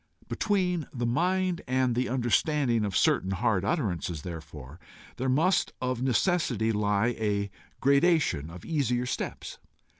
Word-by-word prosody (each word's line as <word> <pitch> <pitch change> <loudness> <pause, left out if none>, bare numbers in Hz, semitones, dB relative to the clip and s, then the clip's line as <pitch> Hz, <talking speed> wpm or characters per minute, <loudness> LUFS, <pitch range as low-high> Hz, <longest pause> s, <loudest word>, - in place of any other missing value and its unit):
Between 180 -6 0
the 120 -2 -3
mind 180 +7 0
and 130 -1 +1
the 125 +2 -1
understanding 125 -1 +1
of 100 -3 -1
certain 95 - +2
hard 95 0 +1
utterances, 90 - -2
therefore, 80 -3 -9 0.4
there 130 +1 -1
must 160 +9 +2
of 125 -1 -2
necessity 130 - +1
lie 105 +1 +1
a 100 -2 -1 0.3
gradation 140 - +2
of 85 +1 -11
easier 125 -6 0
steps. - - -5
120 Hz, 125 wpm, -28 LUFS, 100-150 Hz, 0.4 s, certain